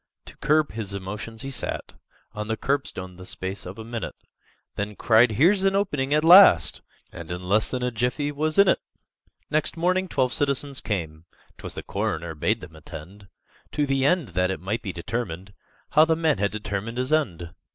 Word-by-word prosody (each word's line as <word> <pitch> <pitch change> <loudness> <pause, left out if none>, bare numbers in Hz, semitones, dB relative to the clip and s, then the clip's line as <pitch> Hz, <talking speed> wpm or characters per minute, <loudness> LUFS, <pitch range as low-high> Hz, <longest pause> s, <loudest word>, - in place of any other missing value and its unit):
To - - -13
curb 150 0 +2
his 105 -3 -4
emotions, 105 +4 -6
he 135 - -5
sat 130 - -4 0.4
On 105 -1 -5
the 110 0 -2
curbstone 120 -11 -2
the 90 - -10
space 95 0 -4
of 95 +4 -8
a 110 - -7
minute, 115 0 -5 0.6
Then 105 +1 -4
cried, 115 +2 +4
"Here's 185 - +4
an 195 0 +3
opening 145 -9 0
at 150 +1 +3
last!" 165 - +7 0.3
And 85 0 -8
in 90 +1 -5
less 105 +4 +2
than 125 -1 -3
a 125 - 0
jiffy 125 +5 -1
was 155 +2 -1
in 200 0 +7
it! - - +4 0.7
Next 155 +2 0
morning 185 +3 +1
twelve 130 -6 0
citizens 140 -1 -1
came 80 -6 -4 0.3
('Twas - - -5
the - - -6
coroner 80 +1 -3
bade 110 +9 0
them 85 -3 -11
attend), 85 +6 -11 0.5
To 145 - +1
the 135 -1 0
end 170 - +2
that 90 +1 0
it 95 - -3
might 105 +5 -3
be 100 - -4
determined 95 0 -5 0.4
How 155 +1 +6
the 160 0 +2
man 160 -9 +1
had 100 0 +2
determined 105 +2 -4
his 130 +4 -1
end! 85 - -1
115 Hz, 190 wpm, -25 LUFS, 95-145 Hz, 0.7 s, last